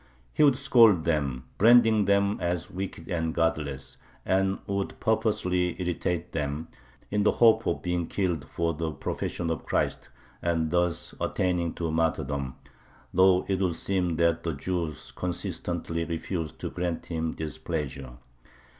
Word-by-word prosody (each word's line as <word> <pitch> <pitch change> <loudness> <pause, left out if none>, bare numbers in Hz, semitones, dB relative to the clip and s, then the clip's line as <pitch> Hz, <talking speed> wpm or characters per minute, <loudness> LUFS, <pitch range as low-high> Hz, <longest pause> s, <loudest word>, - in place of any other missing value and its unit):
He - - 0
would 140 -4 +6
scold 115 - +5
them, 70 -6 0 0.2
branding 110 -1 +6
them 100 +1 +2
as 85 -1 -2
wicked 95 -3 -5
and 80 -3 -1
godless, 75 -5 -1 0.3
and 95 +1 +2
would 100 -1 -3
purposely 90 -6 +1
irritate 90 -1 -2
them, 75 0 -3 0.4
in 105 0 +1
the 105 - +3
hope 115 -1 +5
of - - -1
being 90 -1 -1
killed 90 -7 -1
"for 85 0 -1
the 80 +1 -2
profession 80 +3 -3
of 80 - -3
Christ" - - -1 0.3
and 80 -2 0
thus 90 -1 0
attaining 90 -2 0
to 85 -2 -2
martyrdom, 70 -4 -1 0.6
though 95 0 +5
it 95 -1 0
would 90 -3 +1
seem 90 -3 -1
that 85 0 +2
the 80 -1 -2
Jews 80 +1 -3
consistently 85 -1 -3
refused 85 -1 -4
to - - -3
grant 85 -2 -3
him 80 -1 -2
this 80 -2 -6
pleasure. 70 -5 -4
85 Hz, 145 wpm, -27 LUFS, 80-95 Hz, 0.6 s, would